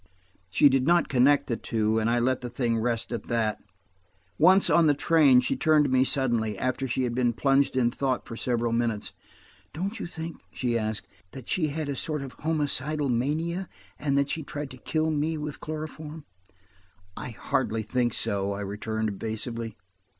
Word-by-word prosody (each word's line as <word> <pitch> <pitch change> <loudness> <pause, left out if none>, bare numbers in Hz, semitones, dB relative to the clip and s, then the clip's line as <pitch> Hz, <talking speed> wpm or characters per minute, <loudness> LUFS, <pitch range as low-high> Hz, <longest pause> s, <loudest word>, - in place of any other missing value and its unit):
She 95 +10 +5
did 135 0 +2
not 175 0 +4
connect 135 +2 +4
the 115 - -1
two, 110 0 0
and 110 +1 +1
I 120 - +2
let 130 +2 +1
the 125 - -5
thing 120 -2 0
rest 115 0 -1
at 120 - -4
that. 110 -2 0 0.8
Once, 185 +5 +6
on 165 -2 +5
the 145 - +4
train, 145 -5 +5
she 125 - -1
turned 155 -2 +4
to 135 - -1
me 130 0 +4
suddenly, 120 -6 0
after 130 +3 -1
she 130 +1 -1
had 120 -1 -1
been 120 -1 +1
plunged 135 +3 +2
in 120 -2 +3
thought 130 -1 -1
for 115 - -7
several 120 -1 0
minutes. 115 -3 -1 0.6
"Don't 195 +8 -3
you - - -4
think," 165 -1 -6
she 120 -2 -1
asked, 110 -1 -2 0.3
"that 130 -3 -9
she 160 -4 +1
had 155 +1 -3
a 140 - -2
sort 150 0 -2 0.2
homicidal 150 -2 0
mania, 160 +9 -1 0.3
and 140 -2 0
that 140 0 +2
she 160 - -2
tried 145 -1 -6
to 130 - -9
kill 155 +4 -1
me 155 +1 0
with 150 -1 -5
chloroform?" 155 0 -7 0.9
"I - - -6
hardly 110 0 -1
think 120 +1 0
so," 100 -3 -1
I 100 - -5
returned 110 +2 -2
evasively. 110 +2 -4
130 Hz, 180 wpm, -27 LUFS, 115-150 Hz, 0.9 s, Once